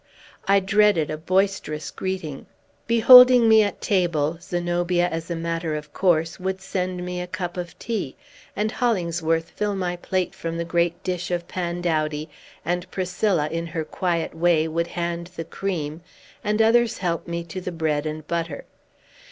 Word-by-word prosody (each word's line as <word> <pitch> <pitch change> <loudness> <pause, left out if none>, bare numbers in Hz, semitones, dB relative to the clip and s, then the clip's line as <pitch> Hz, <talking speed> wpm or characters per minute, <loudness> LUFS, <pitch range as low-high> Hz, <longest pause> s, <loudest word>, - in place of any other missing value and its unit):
I 200 0 +5
dreaded 195 -5 +3
a 155 - -3
boisterous 185 -4 0
greeting. 185 -7 -5 0.4
Beholding 250 +1 +8
me 220 0 +7
at 205 -1 -2
table, 170 -5 +1
Zenobia, 175 0 0
as 165 -1 -5
a 170 - -2
matter 165 -1 -2
of 150 -1 -7
course, 165 -2 +1
would 190 +1 -2
send 185 -2 -3
me 180 0 -4
a 180 - -5
cup 180 -1 -4
of 175 -1 -6
tea, 215 - -3 0.4
and 215 +1 0
Hollingsworth 170 -7 0
fill 210 -1 -2
my 180 -2 -2
plate 185 0 -2
from 165 0 -5
the 170 - -2
great 170 0 0
dish 180 -2 -3
of 175 -1 -2
pandowdy, 165 -4 -2 0.4
and 175 +2 -2
Priscilla, 185 -3 0
in 165 +1 -3
her 160 -1 -3
quiet 170 0 -2
way, 165 -1 +2
would 165 +1 -1
hand 170 0 -3
the 165 - -5
cream, 165 -3 -4 0.4
and 210 +1 +2
others 235 0 +3
help 170 -3 -2
me 170 0 -3
to 175 +3 -7
the 180 - -4
bread 155 -2 -1
and 155 0 -5
butter. 165 -3 -3
175 Hz, 160 wpm, -23 LUFS, 165-190 Hz, 0.4 s, Beholding